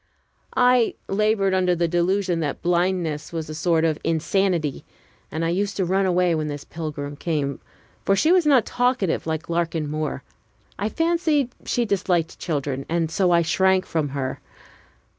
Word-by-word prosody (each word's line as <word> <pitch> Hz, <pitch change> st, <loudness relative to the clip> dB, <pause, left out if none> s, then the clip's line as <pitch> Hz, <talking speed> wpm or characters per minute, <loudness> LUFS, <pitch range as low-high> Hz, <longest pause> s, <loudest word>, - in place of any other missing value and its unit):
I 250 Hz, -2 st, +4 dB
labored 200 Hz, -1 st, +1 dB
under 180 Hz, -1 st, +2 dB
the 170 Hz, 0 st, +1 dB
delusion 175 Hz, +1 st, +1 dB
that 150 Hz, -4 st, -3 dB
blindness 175 Hz, -3 st, 0 dB
was 160 Hz, -2 st, -4 dB
a -, -, -5 dB
sort 165 Hz, 0 st, +1 dB
of 155 Hz, -2 st, 0 dB
insanity, 165 Hz, -2 st, 0 dB, 0.5 s
and 160 Hz, +2 st, -2 dB
I -, -, +1 dB
used 195 Hz, +3 st, -1 dB
to 190 Hz, -, +1 dB
run 190 Hz, +2 st, +1 dB
away 180 Hz, -1 st, +2 dB
when 155 Hz, -1 st, -1 dB
this 145 Hz, -1 st, -5 dB
pilgrim 150 Hz, -3 st, -6 dB
came, 145 Hz, -3 st, -2 dB, 0.4 s
for 195 Hz, -, +3 dB
she 310 Hz, -, +3 dB
was 360 Hz, -4 st, +4 dB
not 265 Hz, -7 st, +5 dB
talkative 245 Hz, -10 st, 0 dB
like 160 Hz, 0 st, -3 dB
Larkin 165 Hz, -2 st, -1 dB
Moore. 155 Hz, 0 st, -3 dB, 0.6 s
I 205 Hz, +2 st, 0 dB
fancied 325 Hz, -4 st, +1 dB
she 240 Hz, -, 0 dB
disliked 180 Hz, -5 st, 0 dB
children, 140 Hz, -4 st, -2 dB
and 165 Hz, -1 st, 0 dB
so 185 Hz, +1 st, +2 dB
I 170 Hz, -1 st, +4 dB
shrank 190 Hz, +3 st, +2 dB
from 155 Hz, -3 st, -1 dB
her. 135 Hz, -1 st, -3 dB
175 Hz, 160 wpm, -23 LUFS, 160-195 Hz, 0.6 s, not